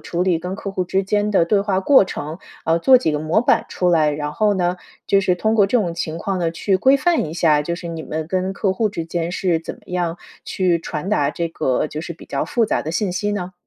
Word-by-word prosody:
处 175 Hz, +1 st, -2 dB
理 180 Hz, -3 st, +2 dB
跟 180 Hz, +3 st, -5 dB
客 200 Hz, 0 st, -5 dB
户 185 Hz, -2 st, -2 dB
之 190 Hz, +2 st, 0 dB
间 205 Hz, +2 st, 0 dB
的 190 Hz, -4 st, +3 dB
对 200 Hz, +4 st, +2 dB
话 195 Hz, -2 st, 0 dB
过 265 Hz, 0 st, +5 dB
程， 155 Hz, -3 st, -6 dB, 0.3 s
呃， 165 Hz, +1 st, +3 dB
做 255 Hz, +9 st, +6 dB
几 160 Hz, -10 st, 0 dB
个 150 Hz, -, 0 dB
模 155 Hz, +8 st, +1 dB
板 245 Hz, -, +2 dB
出 180 Hz, -, 0 dB
来， 160 Hz, -3 st, +3 dB
然 150 Hz, 0 st, -3 dB
后 210 Hz, +6 st, +2 dB
呢， 180 Hz, -1 st, 0 dB, 0.3 s
就 195 Hz, -, +4 dB
是 185 Hz, -2 st, +2 dB
通 220 Hz, +5 st, 0 dB
过 205 Hz, -3 st, +4 dB
这 245 Hz, +5 st, +2 dB
种 170 Hz, -4 st, -2 dB
情 165 Hz, -1 st, -4 dB
况 195 Hz, +1 st, -2 dB
呢， 170 Hz, -2 st, 0 dB
去 190 Hz, +4 st, 0 dB
规 265 Hz, +8 st, +4 dB
范 340 Hz, -, +1 dB
一 155 Hz, -, -7 dB
下， 155 Hz, -4 st, +3 dB
就 170 Hz, +3 st, -3 dB
是 170 Hz, 0 st, -7 dB
你 165 Hz, -1 st, -5 dB
们 155 Hz, 0 st, -4 dB
跟 185 Hz, +2 st, -1 dB
客 195 Hz, -1 st, 0 dB
户 220 Hz, +2 st, +1 dB
之 170 Hz, -5 st, -4 dB
间 170 Hz, 0 st, -3 dB
是 180 Hz, -3 st, 0 dB
怎 165 Hz, -, -7 dB
么 -, -, -21 dB
样 175 Hz, -2 st, -2 dB, 0.3 s
去 180 Hz, -3 st, +1 dB
传 165 Hz, +2 st, -5 dB
达 145 Hz, -9 st, +1 dB
这 170 Hz, +1 st, -3 dB
个 130 Hz, -4 st, -1 dB
就 150 Hz, 0 st, -6 dB
是 170 Hz, -, -6 dB
比 165 Hz, -, -14 dB
较 140 Hz, -, -2 dB
复 235 Hz, -, +1 dB
杂 -, -, 0 dB
的 155 Hz, -, -4 dB
信 195 Hz, +3 st, -1 dB
息 205 Hz, +3 st, -1 dB
呢？ 185 Hz, -2 st, -4 dB
180 Hz, 285 characters per minute, -20 LUFS, 165-195 Hz, 0.3 s, 做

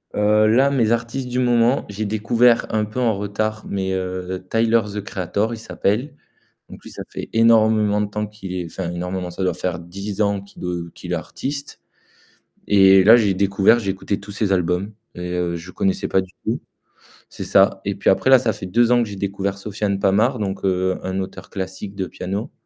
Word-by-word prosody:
Heu, 105 Hz, +1 st, +4 dB
là, 130 Hz, +5 st, +4 dB
mes 115 Hz, -5 st, +2 dB
artistes 120 Hz, +3 st, -1 dB
du 125 Hz, -, -3 dB
moment, 120 Hz, +1 st, +2 dB
j'ai 105 Hz, +1 st, -4 dB
découvert 115 Hz, +3 st, +3 dB
un 110 Hz, -, +2 dB
peu 105 Hz, +4 st, -6 dB
en 115 Hz, -4 st, +2 dB
retard, 110 Hz, +2 st, -3 dB
mais 95 Hz, -1 st, -2 dB
heu, 95 Hz, 0 st, -4 dB
Tyler, 115 Hz, 0 st, +3 dB
the 105 Hz, -, -2 dB
Creator, 100 Hz, +3 st, -2 dB
il -, -, -5 dB
s'appelle. 115 Hz, +6 st, -2 dB, 0.5 s
Donc -, -, -12 dB
lui, -, -, -11 dB
ça -, -, -7 dB
fait -, -, -7 dB
énormément 110 Hz, -2 st, +4 dB
de 105 Hz, -, -1 dB
temps 105 Hz, +1 st, -3 dB
qu'il 100 Hz, -3 st, -8 dB
est 90 Hz, -1 st, -3 dB
enfin, 85 Hz, +1 st, -5 dB
énormément, 90 Hz, +1 st, -4 dB
ça 95 Hz, +2 st, -4 dB
doit 90 Hz, -, +1 dB
faire 90 Hz, -2 st, -3 dB
10 100 Hz, +4 st, -6 dB
ans 100 Hz, -1 st, +1 dB
qu'il 100 Hz, -1 st, -14 dB
est 85 Hz, -2 st, -4 dB
qu'il -, -, -8 dB
est -, -, +2 dB
artiste. 140 Hz, +1 st, -6 dB, 0.9 s
Et 95 Hz, -1 st, +6 dB
là, 110 Hz, +4 st, +9 dB
j'ai 105 Hz, -4 st, +2 dB
découvert, 100 Hz, +4 st, +3 dB
j'ai 100 Hz, -4 st, -1 dB
écouté 95 Hz, +1 st, -3 dB
tous 100 Hz, 0 st, -10 dB
ses 100 Hz, -1 st, -1 dB
albums 90 Hz, +3 st, 0 dB, 0.2 s
et 90 Hz, 0 st, -5 dB, 0.3 s
je 85 Hz, +2 st, -8 dB
connaissais 95 Hz, +1 st, -1 dB
pas 95 Hz, -, +3 dB
du 95 Hz, -1 st, -11 dB
tout -, -, -1 dB, 0.7 s
c'est -, -, -7 dB
ça. -, -, +3 dB
Et -, -, -1 dB
puis -, -, +2 dB
après, 130 Hz, -, +2 dB
là, 130 Hz, -, +9 dB
ça 120 Hz, -3 st, 0 dB
fait 95 Hz, -2 st, -7 dB
2 115 Hz, +5 st, +3 dB
ans 120 Hz, -1 st, +4 dB
que 115 Hz, -, -3 dB
j'ai 100 Hz, -, -7 dB
découvert 100 Hz, 0 st, -3 dB
Sofiane 100 Hz, 0 st, -2 dB
Pamart, 110 Hz, +7 st, +2 dB
donc 100 Hz, -1 st, -3 dB
heu, 95 Hz, -1 st, +1 dB
un 95 Hz, 0 st, -2 dB
auteur 95 Hz, 0 st, -8 dB
classique 95 Hz, +1 st, -6 dB
de 95 Hz, -2 st, -2 dB
piano. 100 Hz, +6 st, -5 dB
100 Hz, 205 wpm, -21 LUFS, 95-110 Hz, 0.9 s, là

